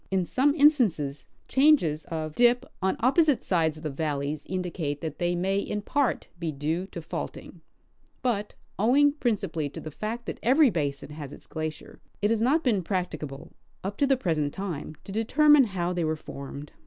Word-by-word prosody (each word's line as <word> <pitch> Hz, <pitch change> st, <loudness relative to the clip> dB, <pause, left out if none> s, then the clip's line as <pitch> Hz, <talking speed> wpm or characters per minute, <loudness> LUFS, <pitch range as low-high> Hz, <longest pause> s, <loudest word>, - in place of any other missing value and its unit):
In 190 Hz, -2 st, +1 dB
some 285 Hz, -, +2 dB
instances, 215 Hz, -, +3 dB, 0.2 s
changes 265 Hz, -, +3 dB
of 155 Hz, -2 st, -4 dB
dijj 245 Hz, +3 st, +4 dB, 0.2 s
on 190 Hz, +1 st, +1 dB
opposite 285 Hz, +3 st, +3 dB
sides 160 Hz, -4 st, +1 dB
of 155 Hz, -, -11 dB
the 155 Hz, -, -2 dB
valleys 145 Hz, 0 st, -3 dB
indicate 175 Hz, -6 st, -3 dB
that 155 Hz, -2 st, -5 dB
they 175 Hz, 0 st, +1 dB
may 190 Hz, +3 st, +1 dB
in 210 Hz, +1 st, -3 dB
part 285 Hz, 0 st, 0 dB
be 165 Hz, -2 st, -2 dB
due 155 Hz, +6 st, -2 dB
to 170 Hz, -4 st, -8 dB
faulting; -, -, -6 dB, 0.6 s
but, 210 Hz, -5 st, -1 dB, 0.2 s
owing 275 Hz, +7 st, +5 dB
principally 195 Hz, -, -1 dB
to -, -, -8 dB
the 155 Hz, -, -7 dB
fact 225 Hz, +8 st, -5 dB
that -, -, -5 dB
every 270 Hz, +2 st, +5 dB
basin 145 Hz, -4 st, -2 dB
has 150 Hz, -2 st, -7 dB
its -, -, -11 dB
glacier, 155 Hz, -1 st, -6 dB, 0.2 s
it 205 Hz, +2 st, +1 dB
has 225 Hz, -1 st, +1 dB
not 290 Hz, +8 st, +3 dB
been 220 Hz, -7 st, +2 dB
practicable, 160 Hz, -5 st, -4 dB, 0.3 s
up 195 Hz, +2 st, -3 dB
to 280 Hz, -, +3 dB
the 270 Hz, -1 st, +3 dB
present 155 Hz, -, -1 dB
time, 175 Hz, -6 st, -5 dB
to -, -, -9 dB
determine 280 Hz, +7 st, +5 dB
how 180 Hz, -4 st, -2 dB
they 175 Hz, -1 st, -1 dB
were 155 Hz, 0 st, 0 dB
formed. 140 Hz, -1 st, -8 dB
180 Hz, 180 wpm, -27 LUFS, 155-240 Hz, 0.6 s, owing